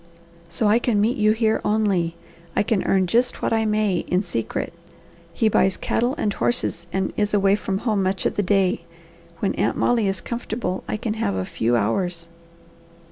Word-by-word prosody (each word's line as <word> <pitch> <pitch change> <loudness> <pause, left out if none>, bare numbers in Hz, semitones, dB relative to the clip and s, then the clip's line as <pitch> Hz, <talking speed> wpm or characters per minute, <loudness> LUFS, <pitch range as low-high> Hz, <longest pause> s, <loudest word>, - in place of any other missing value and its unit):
So 170 +6 +1
I 215 +3 +4
can 235 -4 +1
meet 220 +4 +2
you 215 0 +4
here 220 0 +1
only. 195 -6 +1 0.4
I - - +3
can 215 -2 0
earn 190 -1 +3
just 240 +7 +1
what - - +1
I 220 0 +2
may 210 -3 +1
in 180 +2 +1
secret. 115 - -3 0.6
He 220 +6 +1
buys 195 -2 +3
cattle 245 +3 0
and 210 - 0
horses 175 -9 -1
and 190 0 -1
is 210 0 +1
away 195 -1 +4
from 195 -2 -2
home 215 -2 0
much 190 0 -1
of - - 0
the - - +1
day, 195 -1 +2
and - - -25
when - - 0
Aunt - - 0
Molly 235 -4 +2
is 195 0 -1
comfortable 225 -5 -4
I - - -2
can 215 0 -2
have 100 - -1
a 95 -1 -2
few 115 +5 0
hours." 165 - -1
205 Hz, 190 wpm, -23 LUFS, 180-220 Hz, 0.6 s, I